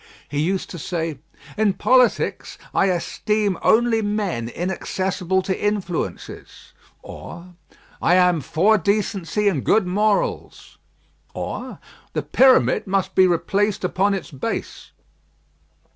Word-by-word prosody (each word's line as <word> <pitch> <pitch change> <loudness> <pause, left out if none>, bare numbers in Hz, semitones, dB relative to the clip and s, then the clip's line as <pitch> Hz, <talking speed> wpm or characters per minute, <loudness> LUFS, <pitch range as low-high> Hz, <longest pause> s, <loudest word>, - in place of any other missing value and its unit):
He 145 - -3
used 185 +5 -1
to 175 - -7
say, 165 -3 -3 0.4
"In 210 -2 +2
politics, 255 +4 +1 0.2
I 195 - +3
esteem 200 +2 -1
only 230 0 +3
men 205 - -2
inaccessible 185 +3 -2
to 190 - -1
influences;" 200 -5 -4 0.3
or, 180 +1 -10 0.5
"I 175 - +4
am 180 -3 +3
for 200 - +2
decency 200 +1 -1
and 165 -10 +1
good 215 -3 +3
morals;" 205 +3 -1 0.6
or, - - -5 0.4
"The - - -2
pyramid 260 -4 +4
must 195 0 -1
be 185 0 +5
replaced 190 +5 0
upon 195 +2 +1
its 190 - -7
base." 135 - -5
190 Hz, 115 wpm, -21 LUFS, 175-210 Hz, 0.6 s, be